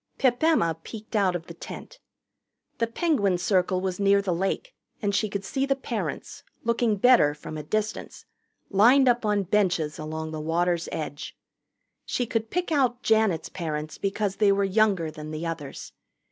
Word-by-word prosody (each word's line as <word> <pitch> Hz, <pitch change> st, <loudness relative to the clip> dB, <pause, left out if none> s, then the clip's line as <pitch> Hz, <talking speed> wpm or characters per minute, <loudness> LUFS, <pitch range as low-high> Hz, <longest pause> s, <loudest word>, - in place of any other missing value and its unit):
Pip 250 Hz, -2 st, +2 dB
Emma 300 Hz, -, +3 dB
peeked 220 Hz, +4 st, -9 dB
out 190 Hz, -4 st, +2 dB
of 165 Hz, -2 st, -4 dB
the 170 Hz, -, -9 dB
tent. -, -, -10 dB, 0.8 s
The 230 Hz, -, +2 dB
Penguin 230 Hz, -, +1 dB
Circle 185 Hz, 0 st, +1 dB
was 185 Hz, -1 st, -3 dB
near 200 Hz, 0 st, +4 dB
the 195 Hz, -3 st, -1 dB
lake, 195 Hz, -, -2 dB, 0.3 s
and 205 Hz, -2 st, -1 dB
she 205 Hz, +2 st, +1 dB
could 195 Hz, -1 st, -4 dB
see 270 Hz, +3 st, -1 dB
the 275 Hz, 0 st, +2 dB
parents, 270 Hz, -, -5 dB, 0.2 s
looking 235 Hz, -1 st, +1 dB
better 205 Hz, -9 st, +5 dB
from 150 Hz, +1 st, -8 dB
a 155 Hz, -, -4 dB
distance, 215 Hz, +7 st, -3 dB, 0.5 s
lined 245 Hz, +7 st, +6 dB
up 240 Hz, -2 st, +2 dB
on 205 Hz, -1 st, +2 dB
benches 180 Hz, -6 st, 0 dB
along 155 Hz, +1 st, -5 dB
the 155 Hz, -1 st, -5 dB
water's 170 Hz, +2 st, 0 dB
edge. 150 Hz, -1 st, -5 dB, 0.7 s
She 245 Hz, -, -1 dB
could 225 Hz, -1 st, -2 dB
pick 360 Hz, -1 st, -2 dB
out 255 Hz, -5 st, +1 dB
Janet's 220 Hz, -7 st, +2 dB
parents 155 Hz, -3 st, -5 dB
because 195 Hz, 0 st, -1 dB
they 205 Hz, -2 st, +4 dB
were 200 Hz, 0 st, +2 dB
younger 195 Hz, -5 st, +2 dB
than 155 Hz, 0 st, -8 dB
the 155 Hz, +2 st, -5 dB
others. 160 Hz, -4 st, -6 dB
200 Hz, 170 wpm, -26 LUFS, 165-230 Hz, 0.8 s, lined